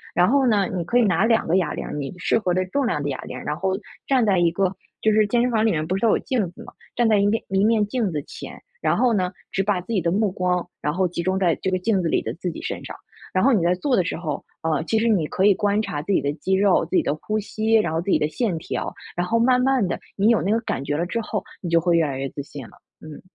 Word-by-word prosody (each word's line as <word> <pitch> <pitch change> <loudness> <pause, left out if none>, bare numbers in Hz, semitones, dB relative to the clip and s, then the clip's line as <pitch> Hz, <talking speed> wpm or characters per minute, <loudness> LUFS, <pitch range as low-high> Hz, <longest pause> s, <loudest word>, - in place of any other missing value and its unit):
然 180 - +4
后 270 +1 +3
呢， 205 -4 +3
你 175 - -1
可 235 +9 +1
以 245 - +5
拿 195 -1 +2
两 230 -1 +2
个 175 +4 +3
哑 185 - 0
铃 - - -5
儿， - - -6
你 145 -2 -4
适 185 - +1
合 185 -4 -1
的 185 +1 +1
重 265 +7 -1
量 150 -11 -1
的 145 - -2
哑 135 - -4
铃， - - -7
然 150 - -1
后 190 +3 -1 0.3
站 260 -4 +3
在 195 -4 +3
一 170 -1 +4
个 190 +2 0 0.2
就 220 - +2
是 215 0 +3
健 240 +3 +2
身 250 - +1
房 220 -2 +2
里 225 - +3
面 155 -4 0
不 185 +3 -1
是 195 - -3
都 230 - +4
有 - - +4
镜 220 -9 -1
子 - - -11
吗？ - - -13 0.2
站 240 -1 +3
在 215 -2 +4
一 200 - +3
面 220 +2 0
一 195 0 +2
面 215 -1 +3
镜 210 -3 -1
子 150 - -2
前， - - -10 0.2
然 - - +1
后 250 -2 +3
呢， 185 -3 0 0.2
只 195 - 0
把 195 -1 +1
自 185 +6 -6
己 195 - +1
的 170 0 0
目 205 0 +1
光， 180 -1 -1
然 150 - 0
后 180 +3 +1
集 170 0 -4
中 185 +2 0
在 180 -3 +2
这 190 - 0
个 185 - +1
镜 195 +1 +1
子 170 - -1
里 - - +1
的 - - -3
自 180 +1 -4
己 - - -8
身 - - -4
上， - - -8 0.4
然 185 +6 +2
后 275 - +5
你 205 - +3
在 175 +1 +3
做 255 +7 0
的 185 - +3
时 175 - -3
候， 155 -4 -4 0.2
呃， 160 -1 0
其 220 - +1
实 230 +2 +2
你 185 -9 +2
可 190 - 0
以 205 - +7
观 205 +2 +1
察 145 - -3
自 200 - -4
己 - - +4
的 145 +1 -1
肌 190 +4 -2
肉， 195 -1 +3
自 - - -4
己 - - +4
的 - - 0
呼 210 +8 -3
吸， 220 +1 -2
然 170 -8 +2
后 165 - 0
自 185 - -5
己 - - +4
的 150 - 0
线 185 +1 -1
条， - - -4 0.2
然 175 +1 -1
后 230 - +2
慢 250 +2 +3
慢 260 -7 +2
的 - - -3 0.2
你 205 +3 +3
有 230 - +4
那 195 - 0
个 225 - +3
感 140 - -3
觉 145 +1 -2
了 170 - 0
之 230 +6 -2
后， 215 -1 -3 0.2
你 175 - -4
就 170 - +4
会 170 0 +2
越 165 - +4
来 135 - -4
越 135 +1 -2
自 140 - -6
信 140 0 -9
了， - - -14 0.3
嗯。 155 -2 -10
190 Hz, 340 characters per minute, -23 LUFS, 170-220 Hz, 0.4 s, 以